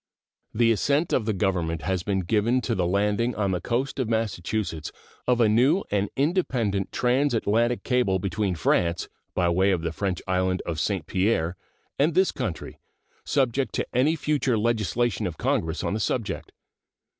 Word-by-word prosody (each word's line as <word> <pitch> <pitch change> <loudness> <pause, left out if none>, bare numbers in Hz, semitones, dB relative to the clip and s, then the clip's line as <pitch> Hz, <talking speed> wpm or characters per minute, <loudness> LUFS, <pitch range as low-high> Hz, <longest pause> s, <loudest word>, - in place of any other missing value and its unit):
The 115 +1 +3
assent 140 - +1
of 115 - +2
the - - +2
Government 90 -4 -1
has 95 -1 0
been 95 +1 -1
given 110 +7 +1
to 120 - -1
the 90 -4 0
landing 105 +5 +1
on 100 -2 0
the 90 - -1
coast 130 +4 -2
of 125 -4 -1
Massachusetts 105 -6 -2 0.4
of 125 -1 +3
a 115 - +5
new 130 - +3
and 100 0 +1
independent 130 - 0
transatlantic 120 -2 +1
cable 125 -7 +2
between 95 +1 -1
France, 85 +2 +1 0.3
by 90 -1 +2
way 95 +3 +3
of 90 -4 0
the 85 - -1
French 95 +1 -2
island 95 0 0
of 80 -2 -3
St. 95 -3 -1
Pierre, 95 -3 0 0.4
and 150 +3 +2
this 190 0 +4
country, 110 -10 -5 0.5
subject 135 -1 0
to - - 0
any 135 +6 +3
future 140 -6 0
legislation 115 -1 0
of 85 -3 -6
Congress 80 +1 -1
on - - -1
the 110 - -1
subject. 110 +1 -2
105 Hz, 165 wpm, -25 LUFS, 95-125 Hz, 0.5 s, a